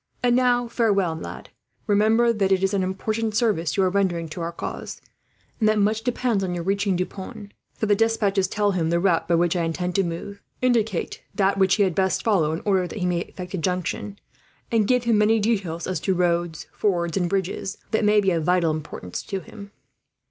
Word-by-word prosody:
"And 245 Hz, -1 st, +4 dB
now 245 Hz, -1 st, +2 dB
farewell, 200 Hz, -7 st, +1 dB
lad. 160 Hz, -, -8 dB, 0.4 s
Remember 220 Hz, +3 st, +3 dB
that 195 Hz, -3 st, 0 dB
it 190 Hz, 0 st, +3 dB
is 195 Hz, +1 st, +1 dB
an 195 Hz, -, +1 dB
important 215 Hz, +4 st, -2 dB
service 200 Hz, -9 st, +1 dB
you 195 Hz, -, +4 dB
are 185 Hz, -, +3 dB
rendering 180 Hz, -4 st, 0 dB
to 170 Hz, +3 st, -6 dB
our 170 Hz, 0 st, -2 dB
cause, 170 Hz, -, -6 dB, 0.6 s
and 215 Hz, -2 st, +3 dB
that 215 Hz, -, +2 dB
much 210 Hz, +2 st, +2 dB
depends 235 Hz, -3 st, 0 dB
on 180 Hz, -2 st, -2 dB
your 170 Hz, -, -3 dB
reaching 195 Hz, +1 st, 0 dB
Deux 180 Hz, +1 st, 0 dB
Ponts; 205 Hz, +2 st, -9 dB, 0.2 s
for -, -, -2 dB
the 210 Hz, -, +3 dB
despatches 205 Hz, -3 st, +2 dB
tell 205 Hz, +1 st, +1 dB
him 170 Hz, -4 st, 0 dB
the 170 Hz, +1 st, +2 dB
route 170 Hz, -3 st, +1 dB
by 170 Hz, -, +3 dB
which 170 Hz, +1 st, +2 dB
I 175 Hz, -, +1 dB
intend 180 Hz, +2 st, -2 dB
to 195 Hz, -, +2 dB
move, 175 Hz, +4 st, -6 dB, 0.2 s
indicate 225 Hz, -7 st, 0 dB
that 195 Hz, -1 st, +2 dB
which 190 Hz, -1 st, +4 dB
he 205 Hz, -, +3 dB
had 185 Hz, -3 st, +1 dB
best 190 Hz, +1 st, 0 dB
follow 180 Hz, -9 st, +2 dB
in 160 Hz, -, -3 dB
order 190 Hz, -3 st, +2 dB
that -, -, -8 dB
he 180 Hz, -, -1 dB
may 175 Hz, -1 st, +1 dB
effect 180 Hz, +1 st, -8 dB
a 190 Hz, -, -2 dB
junction, 185 Hz, +3 st, -2 dB, 0.5 s
and 220 Hz, -3 st, +2 dB
give 250 Hz, 0 st, +2 dB
him 230 Hz, -3 st, +3 dB
many 220 Hz, +1 st, +4 dB
details 195 Hz, -6 st, -1 dB
as 185 Hz, -3 st, -2 dB
to 190 Hz, +4 st, 0 dB
roads, 170 Hz, -2 st, 0 dB
fords, 170 Hz, -5 st, 0 dB
and 180 Hz, -3 st, 0 dB
bridges, 190 Hz, +1 st, -2 dB
that 220 Hz, -, +1 dB
may 210 Hz, 0 st, +4 dB
be 195 Hz, -1 st, +2 dB
of 165 Hz, -2 st, 0 dB
vital 180 Hz, -1 st, +2 dB
importance 150 Hz, -12 st, -5 dB
to 195 Hz, -, -4 dB
him." 200 Hz, +3 st, -11 dB
195 Hz, 215 wpm, -24 LUFS, 175-215 Hz, 0.6 s, And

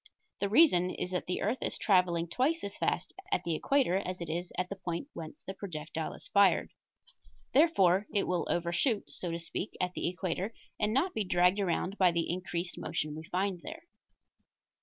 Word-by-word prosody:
The 200 Hz, -, 0 dB
reason 205 Hz, -, +5 dB
is 180 Hz, -, -4 dB
that 180 Hz, -, -2 dB
the 180 Hz, -, -1 dB
earth 225 Hz, +6 st, 0 dB
is -, -, -1 dB
traveling 180 Hz, -4 st, +3 dB
twice 275 Hz, -, +1 dB
as 200 Hz, 0 st, -4 dB
fast -, -, -1 dB, 0.2 s
at -, -, +1 dB
the 170 Hz, -, -1 dB
equator 250 Hz, -, +2 dB
as 185 Hz, -2 st, -3 dB
it 170 Hz, -2 st, -5 dB
is 175 Hz, +2 st, -3 dB
at 180 Hz, 0 st, 0 dB
the 200 Hz, -, -4 dB
point 180 Hz, -, -4 dB
whence 160 Hz, -1 st, -8 dB
the 190 Hz, -, -5 dB
projectile 160 Hz, -5 st, -5 dB
is -, -, -6 dB
fired. 200 Hz, -2 st, +4 dB, 0.8 s
Therefore 205 Hz, -, +4 dB
it 205 Hz, -, +1 dB
will 180 Hz, -1 st, 0 dB
overshoot, 175 Hz, +7 st, 0 dB
so 180 Hz, -, -4 dB
to 165 Hz, -, -2 dB
speak, 170 Hz, +4 st, -4 dB
at 180 Hz, 0 st, 0 dB
the -, -, -2 dB
equator, 185 Hz, +4 st, -3 dB, 0.2 s
and 210 Hz, 0 st, +2 dB
not 305 Hz, +11 st, +1 dB
be 220 Hz, -, 0 dB
dragged 180 Hz, +1 st, +3 dB
around 190 Hz, +1 st, -1 dB
by 185 Hz, -2 st, +6 dB
the 170 Hz, -1 st, 0 dB
increased 180 Hz, 0 st, -3 dB
motion 155 Hz, -2 st, -2 dB
we 160 Hz, +1 st, -7 dB
find 185 Hz, +1 st, -1 dB
there. 325 Hz, +2 st, -8 dB
185 Hz, 190 wpm, -31 LUFS, 170-205 Hz, 0.8 s, by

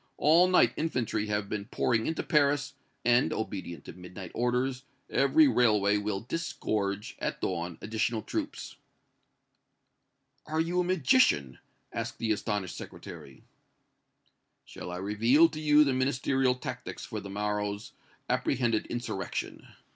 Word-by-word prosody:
All 165 Hz, +5 st, +5 dB
night 150 Hz, -10 st, +4 dB
infantry 130 Hz, -9 st, -1 dB
have 105 Hz, -1 st, -1 dB
been 100 Hz, -1 st, -4 dB
pouring 115 Hz, 0 st, 0 dB
into 160 Hz, -, -1 dB
Paris, 145 Hz, -3 st, +2 dB, 0.3 s
and, 120 Hz, +1 st, +4 dB
obedient 95 Hz, -5 st, -5 dB
to -, -, -8 dB
midnight 90 Hz, 0 st, -9 dB
orders, 125 Hz, +2 st, 0 dB, 0.3 s
every 300 Hz, -, +5 dB
railway 105 Hz, -, +3 dB
will 105 Hz, -1 st, -2 dB
disgorge, 105 Hz, -8 st, -3 dB
at -, -, -3 dB
dawn, 85 Hz, -1 st, -3 dB
additional 110 Hz, 0 st, -1 dB
troops!" -, -, -5 dB, 1.7 s
"Are 155 Hz, +1 st, -1 dB
you 170 Hz, +2 st, +1 dB
a -, -, +3 dB
magician?" 180 Hz, -, +3 dB, 0.3 s
asked -, -, -4 dB
the 115 Hz, -1 st, -1 dB
astonished 105 Hz, -4 st, -2 dB
Secretary. 70 Hz, -2 st, -10 dB, 1.2 s
"Shall -, -, -8 dB
I 90 Hz, -, -5 dB
reveal 115 Hz, -, +4 dB
to 155 Hz, -1 st, -7 dB
you 150 Hz, -1 st, +6 dB
the 140 Hz, -3 st, +1 dB
Ministerial 130 Hz, 0 st, +1 dB
tactics 125 Hz, -, -6 dB
for -, -, -5 dB
the 100 Hz, -, -9 dB
morrow's 105 Hz, +1 st, -2 dB, 0.4 s
apprehended 120 Hz, -4 st, 0 dB
insurrection?" 120 Hz, -5 st, -4 dB
115 Hz, 125 wpm, -29 LUFS, 100-140 Hz, 1.7 s, you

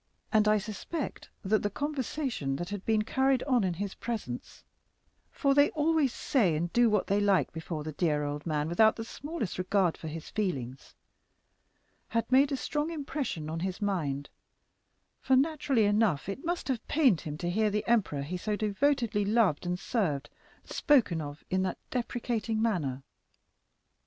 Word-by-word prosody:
And 215 Hz, -1 st, +4 dB
I 215 Hz, 0 st, +5 dB
suspected 220 Hz, -, -5 dB, 0.2 s
that 215 Hz, +2 st, +2 dB
the 205 Hz, -, 0 dB
conversation 265 Hz, -, -2 dB
that 175 Hz, +5 st, -4 dB
had 205 Hz, -2 st, -5 dB
been 220 Hz, -1 st, +3 dB
carried 265 Hz, +3 st, +2 dB
on 250 Hz, -6 st, +2 dB
in 180 Hz, -2 st, 0 dB
his 200 Hz, +2 st, -4 dB
presence 210 Hz, -, -5 dB, 0.7 s
(for 275 Hz, -2 st, +1 dB
they 285 Hz, +1 st, +5 dB
always 310 Hz, -3 st, +2 dB
say 210 Hz, -, +1 dB
and 170 Hz, +3 st, -2 dB
do 240 Hz, -1 st, +5 dB
what 210 Hz, -2 st, +2 dB
they 200 Hz, +1 st, +1 dB
like 200 Hz, -2 st, +2 dB
before 160 Hz, -1 st, -5 dB
the 155 Hz, -, -4 dB
dear 150 Hz, -1 st, 0 dB
old 145 Hz, 0 st, -3 dB
man, 150 Hz, -1 st, 0 dB
without 220 Hz, +6 st, +4 dB
the 225 Hz, -, -5 dB
smallest 285 Hz, -, -5 dB
regard 185 Hz, -2 st, +2 dB
for 160 Hz, -, -8 dB
his 160 Hz, 0 st, -6 dB
feelings) 135 Hz, -, -3 dB, 1.1 s
had 230 Hz, +1 st, -1 dB
made 275 Hz, +2 st, +5 dB
a 275 Hz, -, 0 dB
strong 295 Hz, +3 st, -2 dB
impression 280 Hz, -, -3 dB
on 160 Hz, +1 st, -3 dB
his 185 Hz, +1 st, -3 dB
mind; 150 Hz, -9 st, -1 dB, 0.9 s
for, 265 Hz, -, +3 dB
naturally 280 Hz, -4 st, +2 dB
enough, 205 Hz, -7 st, +2 dB
it 200 Hz, +8 st, -5 dB
must 345 Hz, +1 st, -2 dB
have 260 Hz, -5 st, -2 dB
pained 265 Hz, -, +3 dB
him 150 Hz, -1 st, -5 dB
to 175 Hz, +2 st, -2 dB
hear 215 Hz, +3 st, +2 dB
the 210 Hz, 0 st, -1 dB
emperor 205 Hz, -12 st, +2 dB
he 175 Hz, +6 st, -4 dB
so 210 Hz, +3 st, -2 dB
devotedly 220 Hz, +1 st, +1 dB
loved 200 Hz, -6 st, +2 dB
and 180 Hz, 0 st, 0 dB
served 175 Hz, -, -1 dB, 0.3 s
spoken 240 Hz, -, +2 dB
of 145 Hz, 0 st, -7 dB
in 185 Hz, 0 st, +2 dB
that 185 Hz, -1 st, -1 dB
depreciating 235 Hz, -2 st, -2 dB
manner." 155 Hz, -, 0 dB
210 Hz, 165 wpm, -30 LUFS, 170-255 Hz, 1.1 s, I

